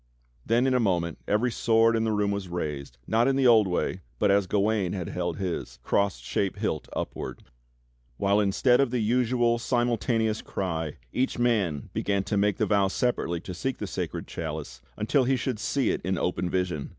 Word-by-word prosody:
Then 120 Hz, +3 st, +2 dB
in 130 Hz, -, +2 dB
a 125 Hz, -, +3 dB
moment 85 Hz, -6 st, 0 dB
every 110 Hz, +4 st, +2 dB
sword 115 Hz, 0 st, +3 dB
in 115 Hz, 0 st, +1 dB
the 110 Hz, -, +1 dB
room 105 Hz, -1 st, +1 dB
was 100 Hz, -2 st, -3 dB
raised, 75 Hz, -7 st, -4 dB
not 115 Hz, +3 st, +2 dB
in 135 Hz, -, +2 dB
the 135 Hz, -1 st, +2 dB
old 115 Hz, -4 st, +6 dB
way, 90 Hz, +1 st, -1 dB, 0.2 s
but 100 Hz, -, +3 dB
as 100 Hz, -1 st, +3 dB
Gawain 100 Hz, -2 st, +1 dB
had 90 Hz, -4 st, -4 dB
held 90 Hz, -2 st, -2 dB
his 95 Hz, -3 st, -4 dB
— -, -, -38 dB
cross 100 Hz, -5 st, +1 dB
shaped 75 Hz, +11 st, -2 dB
hilt -, -, -2 dB
upward; -, -, -5 dB, 0.7 s
while 100 Hz, +1 st, +2 dB
instead 105 Hz, +5 st, +3 dB
of 140 Hz, -2 st, +3 dB
the 125 Hz, -, -1 dB
usual 120 Hz, +1 st, +2 dB
simultaneous 115 Hz, -2 st, 0 dB
cry, 80 Hz, -5 st, -3 dB, 0.2 s
each 130 Hz, +1 st, 0 dB
man 105 Hz, -, 0 dB
began 100 Hz, -1 st, 0 dB
to 105 Hz, -, -2 dB
make 100 Hz, 0 st, +2 dB
the -, -, +2 dB
vow 100 Hz, -2 st, +3 dB
separately 95 Hz, -5 st, -1 dB
to 90 Hz, -, -7 dB
seek 130 Hz, +9 st, -3 dB
the -, -, -4 dB
Sacred -, -, -4 dB
Chalice 80 Hz, -2 st, -6 dB, 0.2 s
until 130 Hz, +5 st, +2 dB
he 135 Hz, +1 st, +2 dB
should 125 Hz, -2 st, -2 dB
see 135 Hz, +1 st, +1 dB
it -, -, -2 dB
in 95 Hz, +1 st, -1 dB
open 90 Hz, +1 st, -1 dB
vision. 90 Hz, -5 st, -2 dB
105 Hz, 195 wpm, -27 LUFS, 90-120 Hz, 0.7 s, old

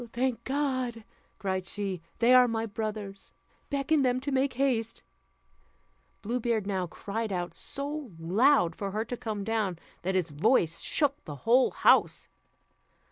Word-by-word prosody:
"Thank 250 Hz, 0 st, -1 dB
God," 260 Hz, -5 st, -1 dB, 0.3 s
cried 190 Hz, -1 st, -2 dB
she, 195 Hz, -4 st, -4 dB, 0.2 s
"they 240 Hz, +2 st, +5 dB
are 250 Hz, -1 st, +7 dB
my 225 Hz, -1 st, -1 dB
brothers; 210 Hz, -2 st, -6 dB, 0.4 s
beckon 285 Hz, +1 st, +1 dB
them 255 Hz, -1 st, +2 dB
to 285 Hz, +2 st, -3 dB
make 270 Hz, 0 st, +1 dB
haste." 240 Hz, -4 st, -1 dB, 1.2 s
Blue 240 Hz, +4 st, -1 dB
Beard 230 Hz, -3 st, 0 dB
now 190 Hz, -3 st, -1 dB
cried 215 Hz, +5 st, -4 dB
out 175 Hz, -2 st, -3 dB
so 285 Hz, -, -4 dB
loud 180 Hz, -, +3 dB
for 200 Hz, -, -4 dB
her 215 Hz, +3 st, -2 dB
to 245 Hz, -, -4 dB
come 215 Hz, -4 st, -4 dB
down, 210 Hz, -4 st, -1 dB, 0.2 s
that 190 Hz, +2 st, -1 dB
his 175 Hz, -4 st, 0 dB
voice 165 Hz, -, +2 dB
shook 290 Hz, -1 st, 0 dB
the 145 Hz, -, -6 dB
whole 250 Hz, +3 st, +5 dB
house. -, -, +3 dB
225 Hz, 145 wpm, -29 LUFS, 195-260 Hz, 1.2 s, are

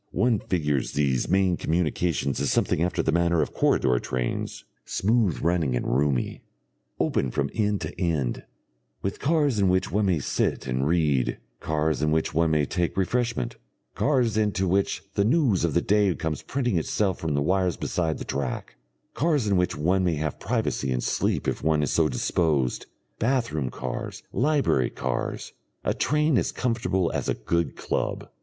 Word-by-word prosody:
One 115 Hz, +2 st, +2 dB
figures 75 Hz, -9 st, -1 dB
these 70 Hz, -4 st, +1 dB
main 95 Hz, -1 st, +3 dB
communications 80 Hz, -4 st, 0 dB
as 70 Hz, -1 st, 0 dB
something -, -, +1 dB
after 85 Hz, -1 st, 0 dB
the -, -, +1 dB
manner 85 Hz, -1 st, +2 dB
of -, -, -6 dB
corridor 65 Hz, -3 st, +2 dB
trains, 60 Hz, -1 st, -3 dB, 0.2 s
smooth 105 Hz, -, +1 dB
running 85 Hz, -6 st, +1 dB
and -, -, -2 dB
roomy, 65 Hz, -1 st, 0 dB, 0.6 s
open 65 Hz, -, +1 dB
from 70 Hz, +2 st, -1 dB
end 105 Hz, -2 st, 0 dB
to -, -, -6 dB
end, 75 Hz, -8 st, 0 dB, 0.6 s
with 95 Hz, -, -3 dB
cars 145 Hz, -6 st, +2 dB
in 100 Hz, -2 st, +3 dB
which 95 Hz, 0 st, +1 dB
one 105 Hz, 0 st, +1 dB
may 90 Hz, -3 st, +2 dB
sit 70 Hz, -, -1 dB
and 65 Hz, +1 st, -1 dB
read, 75 Hz, -6 st, +1 dB, 0.2 s
cars 80 Hz, -1 st, 0 dB
in 75 Hz, -, +2 dB
which 80 Hz, +1 st, 0 dB
one 80 Hz, +1 st, +2 dB
may 75 Hz, -2 st, +2 dB
take 90 Hz, +3 st, -2 dB
refreshment, 95 Hz, -, -1 dB, 0.4 s
cars 125 Hz, -7 st, +1 dB
into 105 Hz, -3 st, +1 dB
which 95 Hz, +2 st, 0 dB
the 100 Hz, -, +2 dB
news 120 Hz, -, +2 dB
of 85 Hz, -3 st, 0 dB
the 85 Hz, -, +3 dB
day 100 Hz, -3 st, +3 dB
comes 80 Hz, -3 st, -3 dB
printing 120 Hz, -9 st, 0 dB
itself 95 Hz, +4 st, 0 dB
from 80 Hz, -3 st, -1 dB
the 70 Hz, -, +1 dB
wires 90 Hz, +1 st, +1 dB
beside 80 Hz, -3 st, -1 dB
the -, -, -6 dB
track; 70 Hz, -2 st, -4 dB, 0.4 s
cars 150 Hz, -5 st, +1 dB
in 100 Hz, -2 st, +2 dB
which 90 Hz, -1 st, +1 dB
one 90 Hz, +6 st, +2 dB
may 85 Hz, -3 st, +1 dB
have 75 Hz, 0 st, -3 dB
privacy 70 Hz, -, -1 dB
and 60 Hz, -1 st, -1 dB
sleep -, -, 0 dB
if -, -, -1 dB
one 80 Hz, -1 st, +2 dB
is -, -, 0 dB
so 80 Hz, -2 st, +3 dB
disposed, 70 Hz, -1 st, 0 dB, 0.3 s
bath 125 Hz, 0 st, +1 dB
room 70 Hz, -5 st, -2 dB
cars, 65 Hz, -1 st, -5 dB
library 135 Hz, -, +2 dB
cars; 65 Hz, -1 st, -3 dB, 0.3 s
a -, -, +1 dB
train 150 Hz, -3 st, +2 dB
as -, -, -1 dB
comfortable 115 Hz, -7 st, 0 dB
as -, -, -2 dB
a -, -, +1 dB
good 80 Hz, +4 st, -1 dB
club. -, -, -2 dB
85 Hz, 175 wpm, -26 LUFS, 75-100 Hz, 0.6 s, main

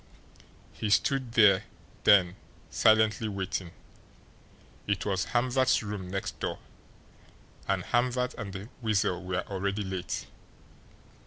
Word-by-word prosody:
He 110 Hz, -, -3 dB
stood 130 Hz, +3 st, +1 dB
there 100 Hz, -5 st, +5 dB, 0.4 s
then 90 Hz, -3 st, +5 dB, 0.4 s
silently 110 Hz, 0 st, +3 dB
waiting. 95 Hz, -2 st, -3 dB, 1.2 s
It 100 Hz, -1 st, -1 dB
was 95 Hz, -3 st, 0 dB
Hamvert's 125 Hz, 0 st, +2 dB
room 100 Hz, -3 st, -5 dB
next 95 Hz, +1 st, -4 dB
door, -, -, -3 dB, 1.1 s
and -, -, 0 dB
Hamvert 125 Hz, +1 st, 0 dB
and 105 Hz, -4 st, -6 dB
the 95 Hz, +3 st, -8 dB
Weasel 100 Hz, -5 st, 0 dB
were 90 Hz, 0 st, -2 dB
already 100 Hz, +1 st, -2 dB
late. 95 Hz, -2 st, -4 dB
100 Hz, 105 wpm, -29 LUFS, 95-115 Hz, 1.2 s, there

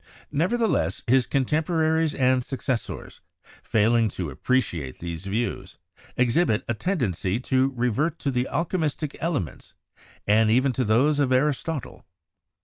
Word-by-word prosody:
Nev 170 Hz, +10 st, +1 dB
ertheless, 235 Hz, -2 st, 0 dB
his 130 Hz, +1 st, +4 dB
contemporaries 160 Hz, +3 st, +1 dB
and 130 Hz, -1 st, +2 dB
successors, 130 Hz, -2 st, -4 dB, 0.4 s
failing 115 Hz, +1 st, +2 dB
to 90 Hz, -6 st, -5 dB
ap 65 Hz, -, -14 dB
preciate 90 Hz, -, 0 dB
these 85 Hz, +2 st, -6 dB
views, 115 Hz, +5 st, -3 dB, 0.4 s
exhibit 125 Hz, -1 st, +2 dB
a 120 Hz, -, 0 dB
tendency 110 Hz, -, -1 dB
to 130 Hz, +1 st, +2 dB
revert 125 Hz, +7 st, 0 dB
to 140 Hz, -, -2 dB
the 125 Hz, 0 st, 0 dB
alchemistic 160 Hz, -4 st, -1 dB
elements 150 Hz, -, -3 dB, 0.5 s
and 110 Hz, +1 st, +4 dB
even 130 Hz, +4 st, +3 dB
to 130 Hz, -, 0 dB
those 130 Hz, +7 st, +3 dB
of 135 Hz, -3 st, +2 dB
Aristotle. 145 Hz, +2 st, -1 dB
130 Hz, 130 wpm, -25 LUFS, 110-150 Hz, 0.5 s, his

